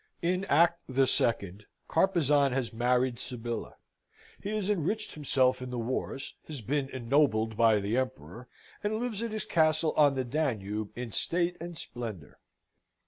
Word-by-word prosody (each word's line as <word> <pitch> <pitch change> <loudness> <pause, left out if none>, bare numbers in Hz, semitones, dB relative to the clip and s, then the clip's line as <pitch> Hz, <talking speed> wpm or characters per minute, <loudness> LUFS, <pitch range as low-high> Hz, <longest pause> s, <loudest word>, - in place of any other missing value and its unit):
In 180 +3 +1
act 170 +1 +4
the 135 +1 +3
second, 105 -6 0 0.2
Carpezan 150 -6 +3
has 125 -3 -2
married 125 +1 +1
Sybilla. 120 -1 -5 0.7
He 200 - -4
has 210 -2 -1
enriched 210 +2 -1
himself 130 -4 +2
in 125 - -5
the 125 - -4
wars, 130 +3 -3
has 150 -5 -6
been 135 +5 -1
ennobled 120 -4 +1
by 110 -1 +5
the 100 +4 -1
Emperor, 125 - -4 0.4
and 210 +1 0
lives 235 -3 -3
at 230 - -2
his 215 -2 -3
castle 155 -1 +2
on 145 -2 +5
the 130 -1 -1
Danube 110 -7 -2
in 120 -1 -5
state 175 - 0
and 170 -1 -6
splendour. 110 - -7
130 Hz, 150 wpm, -30 LUFS, 115-165 Hz, 0.7 s, by